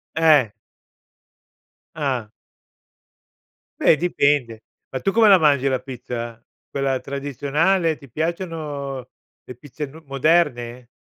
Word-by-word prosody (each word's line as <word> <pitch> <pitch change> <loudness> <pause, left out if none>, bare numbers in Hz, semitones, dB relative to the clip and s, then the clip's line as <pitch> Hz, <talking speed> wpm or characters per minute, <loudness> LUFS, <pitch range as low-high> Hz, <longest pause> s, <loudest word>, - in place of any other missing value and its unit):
Eh. 150 -9 +4 1.4
Ah. 130 -8 -2 1.5
Beh - - +5
dipende. 140 -9 +1 0.3
Ma 130 - -4
tu 195 - +1
come 225 +1 +5
la 195 -2 +8
mangi 140 -4 +3
la 130 -1 +1
pizza? 120 -3 -6 0.3
Quella 135 -1 -1
tradizionale, 145 +6 0
ti 140 - -15
piacciono 150 -4 -4 0.4
le 125 - -9
pizze 145 +4 -7
n 155 +4 -13
moderne? 135 -4 +1
140 Hz, 105 wpm, -22 LUFS, 125-160 Hz, 1.5 s, la